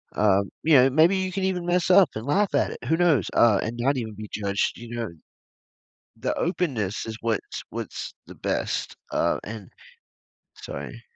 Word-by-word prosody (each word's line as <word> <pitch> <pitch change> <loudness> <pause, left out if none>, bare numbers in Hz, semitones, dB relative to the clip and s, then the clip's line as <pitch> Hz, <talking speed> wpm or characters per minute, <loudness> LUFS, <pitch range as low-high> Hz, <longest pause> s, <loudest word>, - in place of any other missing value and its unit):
um, 100 -2 +3
you 160 -1 +5
know, 130 0 +7
maybe 160 +7 +4
you 185 0 -1
can 195 +1 -2
even 185 -2 -1
mess 175 0 +1
up 185 -4 +7
and 110 +2 -5
laugh 195 +7 +2
at - - +2
it, - - -9
who 160 - +2
knows, 160 - +3
uh, 110 -4 +5
and 115 +2 -4
not 135 +3 +2
even 110 -3 -4
be 105 0 -8
judged, 100 -1 -1
you 120 0 -8
know 115 -2 -3 1.1
the - - -1
openness 130 - -1
is 110 - -5
what's 115 -2 -2
what's - - -5
the - - -11
best, - - -2 0.2
uh, - - +1
and 110 -1 -8 0.8
sorry. - - -8
125 Hz, 180 wpm, -25 LUFS, 110-175 Hz, 1.1 s, know